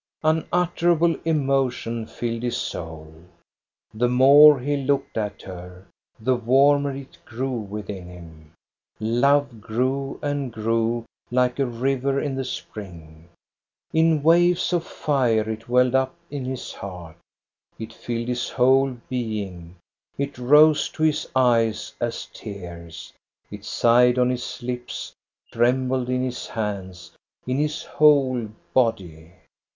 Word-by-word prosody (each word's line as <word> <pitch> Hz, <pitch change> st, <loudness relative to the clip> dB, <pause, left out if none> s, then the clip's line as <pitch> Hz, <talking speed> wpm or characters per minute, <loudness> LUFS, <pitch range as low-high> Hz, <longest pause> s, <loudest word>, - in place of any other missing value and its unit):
Unutterable 170 Hz, +1 st, +2 dB
emotion 135 Hz, -7 st, 0 dB
filled 115 Hz, -1 st, -4 dB
his 120 Hz, -1 st, -2 dB
soul. 80 Hz, -2 st, -6 dB, 0.8 s
The 120 Hz, +3 st, +1 dB
more 140 Hz, +3 st, +7 dB
he 145 Hz, +3 st, -1 dB
looked 140 Hz, 0 st, -1 dB
at 105 Hz, -2 st, -3 dB
her, 90 Hz, 0 st, -10 dB, 0.3 s
the 125 Hz, +3 st, +1 dB
warmer 140 Hz, +4 st, +3 dB
it 135 Hz, -1 st, -11 dB
grew 130 Hz, +3 st, -4 dB
within 105 Hz, -3 st, -7 dB
him. 80 Hz, -3 st, -14 dB, 0.5 s
Love 120 Hz, +2 st, +1 dB
grew 130 Hz, +5 st, -2 dB
and 145 Hz, -3 st, -2 dB
grew, 115 Hz, +1 st, -1 dB, 0.2 s
like 125 Hz, +1 st, +1 dB
a 135 Hz, -, +2 dB
river 135 Hz, +3 st, -1 dB
in 145 Hz, -2 st, -2 dB
the 135 Hz, 0 st, -2 dB
spring. 85 Hz, -9 st, -9 dB, 0.6 s
In 160 Hz, -2 st, +3 dB
waves 175 Hz, +2 st, +3 dB
of 170 Hz, -1 st, 0 dB
fire 120 Hz, -7 st, 0 dB
it 110 Hz, +1 st, -6 dB
welled 125 Hz, 0 st, +3 dB
up 130 Hz, +4 st, +1 dB, 0.2 s
in 140 Hz, -3 st, -4 dB
his 130 Hz, -1 st, -5 dB
heart, 90 Hz, -4 st, -9 dB, 0.6 s
it 110 Hz, -, -8 dB
filled 120 Hz, 0 st, -4 dB
his 125 Hz, 0 st, -2 dB
whole 130 Hz, 0 st, +3 dB
being, 100 Hz, -8 st, -4 dB, 0.4 s
it 140 Hz, 0 st, -3 dB
rose 150 Hz, +4 st, +5 dB
to 155 Hz, -, -3 dB
his 155 Hz, -1 st, +1 dB
eyes 115 Hz, -4 st, +2 dB
as 120 Hz, -1 st, -3 dB
tears; 85 Hz, -6 st, -9 dB, 0.4 s
it -, -, -9 dB
sighed 125 Hz, +1 st, +4 dB
on 125 Hz, 0 st, +3 dB
his 125 Hz, 0 st, -5 dB
lips, 125 Hz, 0 st, -5 dB, 0.4 s
trembled 125 Hz, +1 st, +1 dB
in 125 Hz, 0 st, 0 dB
his 125 Hz, -1 st, -4 dB
hands, 95 Hz, -5 st, -5 dB, 0.3 s
in 130 Hz, +2 st, -1 dB
his 150 Hz, +2 st, -1 dB
whole 135 Hz, -6 st, +3 dB, 0.2 s
body. 90 Hz, -10 st, -1 dB
125 Hz, 125 wpm, -23 LUFS, 110-140 Hz, 0.8 s, more